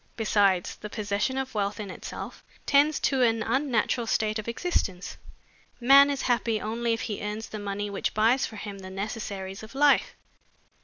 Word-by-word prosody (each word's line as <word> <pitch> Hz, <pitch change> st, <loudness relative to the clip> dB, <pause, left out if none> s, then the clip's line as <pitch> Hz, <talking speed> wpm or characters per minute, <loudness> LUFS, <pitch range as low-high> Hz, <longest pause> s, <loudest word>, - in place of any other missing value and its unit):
Besides, 200 Hz, -5 st, +2 dB
the 210 Hz, -, -8 dB
possession 210 Hz, +5 st, -1 dB
of 265 Hz, -1 st, -3 dB
wealth 205 Hz, -1 st, -1 dB
in 205 Hz, -3 st, -5 dB
itself -, -, -8 dB, 0.2 s
tends 290 Hz, +1 st, +4 dB
to 265 Hz, -2 st, +1 dB
an 225 Hz, -2 st, +3 dB
unnatural 240 Hz, -2 st, 0 dB
state 215 Hz, 0 st, 0 dB
of 215 Hz, -, -7 dB
existence. 230 Hz, -, -2 dB, 0.6 s
Man 275 Hz, +3 st, +7 dB
is 280 Hz, -1 st, -2 dB
happy 235 Hz, -3 st, +1 dB
only 230 Hz, +2 st, -1 dB
if 225 Hz, -, -2 dB
he 210 Hz, -, -4 dB
earns 210 Hz, +2 st, -4 dB
the 215 Hz, -, -6 dB
money 205 Hz, 0 st, -3 dB
which 200 Hz, -1 st, -3 dB
buys 230 Hz, +5 st, +3 dB
for 220 Hz, -, -4 dB
him 200 Hz, -1 st, -7 dB
the 190 Hz, -1 st, -9 dB
necessaries 195 Hz, -1 st, -5 dB
of 220 Hz, +3 st, -12 dB
life." 290 Hz, +1 st, +3 dB
220 Hz, 170 wpm, -27 LUFS, 205-245 Hz, 0.6 s, Man